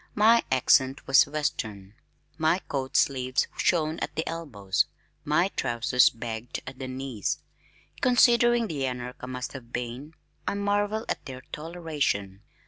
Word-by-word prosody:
My 225 +2 +6
accent 130 +1 +3
was 135 0 +6
western. 110 -9 -3 0.4
My 160 +2 +2
coat 135 -7 -3
sleeves 130 -1 +2
shone 160 -2 +1
at - - -4
the 160 - -2
elbows, 120 - -1 0.4
my - - +2
trousers 120 +1 +3
bagged 115 0 -5
at 130 0 -9
the 130 - -4
knees. 130 -5 -3 0.6
Considering 240 -1 +5
the 145 -9 -2
anarch 125 0 -5
I 125 - -6
must 125 0 -5
have 120 -3 -10
been, 125 +6 -5 0.3
I - - 0
marvel 205 +2 0
at - - -3
their 130 -1 -7
toleration. 150 - -2
135 Hz, 135 wpm, -27 LUFS, 125-165 Hz, 0.6 s, My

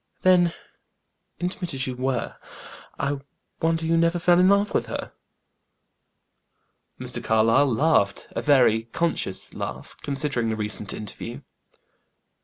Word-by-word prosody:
"Then 175 -2 +4 0.8
intimate 180 -3 -3
as 135 0 0
you 130 - -4
were 130 -1 -2 0.6
I 140 0 -1 0.4
wonder 165 0 +1
you 165 +1 +2
never 170 +1 +2
fell 175 0 +4
in 185 +1 +6
love 200 +1 +3
with - - 0
her." - - -5 1.9
Mr. - - -5
Carlyle 115 +5 +3
laughed; 115 -6 +2
a - - -3
very 125 -6 +4
conscious 115 - -2
laugh, - - -6
considering 135 -4 0
the 110 - -1
recent 105 -1 -2
interview. 115 +5 -7
140 Hz, 120 wpm, -24 LUFS, 115-170 Hz, 1.9 s, in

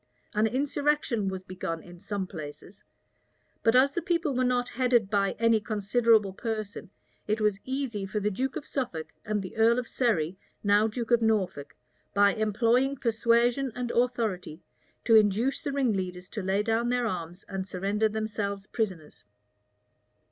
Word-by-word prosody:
An 215 +1 +3
insurrection 280 -3 0
was 190 -1 -3
begun 180 -3 -5
in 175 0 -13
some 200 +1 -3
places; 160 +2 -9 0.8
but 225 +1 +3
as 265 +2 +6
the 345 - -2
people 335 -3 0
were 255 - +2
not 250 -1 +1
headed 240 -5 +2
by 200 -1 +2
any 230 -1 +4
considerable 215 0 +2
person, 215 -3 -5 0.4
it 215 +1 0
was 210 -2 +1
easy 260 -7 -3
for 210 +2 -2
the 210 +1 0
duke 260 +7 -2
of 290 - -5
Suffolk, 175 - -3 0.2
and 210 -2 -1
the 185 - -8
earl 230 +2 +5
of 250 -2 -2
Surrey, 190 -8 0 0.2
now 205 +1 +4
duke 230 +1 -4
of 235 -1 +5
Norfolk, 205 -10 0 0.4
by 200 0 +5
employing 230 +5 +2
persuasion 235 +2 +2
and 245 -1 -3
authority, 225 -10 -1 0.5
to 230 - +4
induce 215 +5 +3
the 285 - -3
ringleaders 190 -9 -1
to 215 - -4
lay 195 +2 +1
down 225 +2 +1
their 245 -1 +1
arms 175 -3 -4
and 195 -1 -4
surrender 200 +4 0
themselves 210 -2 -3
prisoners. 170 - -4
215 Hz, 155 wpm, -28 LUFS, 195-245 Hz, 0.8 s, as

